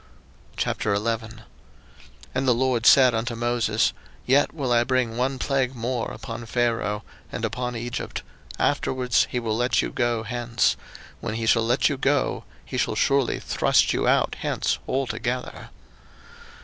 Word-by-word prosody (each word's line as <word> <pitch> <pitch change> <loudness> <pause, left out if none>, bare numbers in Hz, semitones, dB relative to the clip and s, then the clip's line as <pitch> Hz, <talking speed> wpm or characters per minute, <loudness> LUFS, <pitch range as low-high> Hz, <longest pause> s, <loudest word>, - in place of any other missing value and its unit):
02:011:001 110 +2 -1 0.9
And 130 +1 -1
the 125 - +5
LORD 125 -2 +1
said 130 -3 +7
unto 115 +1 -2
Moses, 115 -1 +1 0.3
Yet 135 +3 +3
will 140 -5 -3
I 120 0 +4
bring 125 -2 0
one 130 +2 0
plague 135 -1 0
more 120 0 -2
upon 115 - -7
Pharaoh, 115 -3 0 0.3
and 110 - -2
upon 125 +2 -3
Egypt; 120 +1 -4 0.3
afterwards 125 -2 +1
he 125 - -1
will 110 -2 -1
let 120 +1 +2
you - - -3
go 120 -2 0
hence: 120 +1 0 0.4
when 110 - -4
he 115 0 -2
shall 115 +1 +4
let 120 +3 +3
you 140 - -1
go, 140 0 +1 0.2
he - - -4
shall - - 0
surely 140 -2 +2
thrust - - +2
you - - 0
out - - +2
hence - - -1
altogether. 125 -1 -3
120 Hz, 145 wpm, -24 LUFS, 115-130 Hz, 0.9 s, said